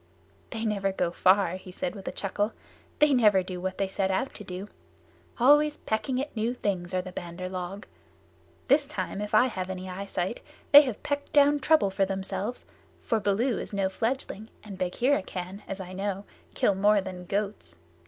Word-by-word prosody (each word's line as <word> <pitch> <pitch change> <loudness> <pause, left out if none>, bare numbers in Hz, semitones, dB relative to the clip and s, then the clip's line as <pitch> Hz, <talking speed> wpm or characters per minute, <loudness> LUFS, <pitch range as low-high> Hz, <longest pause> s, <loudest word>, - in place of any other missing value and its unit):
"They 225 -1 -4
never 200 -2 0
go 175 -2 -1
far," 185 0 +3
he 185 0 -11
said 265 +7 -3
with 195 -3 -10
a - - -1
chuckle. 205 +2 -2 0.4
"They 300 -1 +5
never 210 -7 +5
do 180 -1 -6
what 185 0 -3
they 195 - 0
set 190 0 -1
out 195 +8 -1
to 210 - -9
do. 185 +1 -6 0.7
Always 295 +4 +5
pecking 220 +4 -1
at 285 0 -4
new 230 +3 0
things 185 -7 -2
are 185 - 0
the 185 - -8
Bandar 175 +1 -6
log. 185 +2 -5 0.8
This 280 +1 +4
time, 275 -8 -4
if 210 +1 -2
I 215 - +7
have 190 -7 -3
any 185 0 -5
eye 195 +2 -5
sight, 185 +4 -2 0.3
they 290 - +12
have 255 -7 -4
pecked 285 0 -3
down 290 0 +5
trouble 285 -9 +3
for 195 0 +2
themselves, 195 +4 -3 0.3
for 225 - 0
Baloo 215 +5 +1
is - - -6
no 195 -1 +1
fledgling 225 0 -3
and 210 -2 -8
Bagheera 195 +9 +1
can, 185 +2 -6
as 195 - -5
I 185 -1 -7
know, 195 +1 -3 0.3
kill 205 - +3
more 205 +2 +4
than 185 -1 -7
goats." 200 - -3
200 Hz, 190 wpm, -28 LUFS, 185-235 Hz, 0.8 s, they